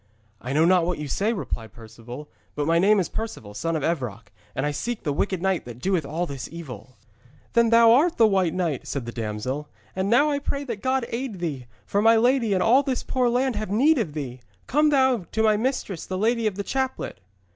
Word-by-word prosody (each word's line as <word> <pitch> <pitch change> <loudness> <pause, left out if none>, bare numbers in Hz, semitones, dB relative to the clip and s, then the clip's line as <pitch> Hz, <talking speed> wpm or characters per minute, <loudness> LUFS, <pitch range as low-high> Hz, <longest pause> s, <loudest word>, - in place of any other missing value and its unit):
'I 125 +3 -4
know 155 +3 +4
not 180 0 +4
what 180 - -1
you 150 - -5
say,' 200 - 0
replied 115 - -5
Perceval, 120 +5 -10 0.3
'but 145 - -1
my 165 +2 +3
name 205 +3 +4
is 180 - 0
Perceval, 170 - -6
son 165 +9 -2
of 155 - -2
Evroc, 120 -10 -3 0.2
and 135 - -1
I 150 - 0
seek 235 +11 -4
the 145 - -1
wicked 190 +3 -1
knight 190 -2 +1
that 120 -1 -9
doeth 175 0 -1
all 165 +4 -2
this 140 -5 -6
evil.' 130 -8 -9 0.6
'Then 235 -1 +4
thou 230 0 +7
art 310 +8 +4
the 230 - +6
White 190 -5 +2
Knight,' 165 -8 -2
said 140 -4 -3
the 120 - -5
damsel, 115 +6 -4 0.3
'and 190 +1 -1
now 290 +6 +4
I 285 - 0
pray 280 0 -3
that 230 -7 -5
God 260 -1 0
aid 235 -3 -4
thee, 145 -8 -4 0.2
for 200 - 0
my 225 +1 +6
lady 240 0 +3
and 185 - +1
all 250 +5 +5
this 265 -2 -2
poor 250 -2 +1
land 250 +1 +1
have 215 -1 -4
need 270 +9 +3
of 165 -10 -2
thee. 130 -4 -5 0.3
Come 300 +3 +3
thou 260 - +2
to 220 - +1
my 215 -1 +4
mistress, 220 - -2
the 185 - -3
lady 225 +2 +1
of 205 - -2
the 200 - -3
Chaplet.' 265 - -3
190 Hz, 225 wpm, -24 LUFS, 145-235 Hz, 0.6 s, thou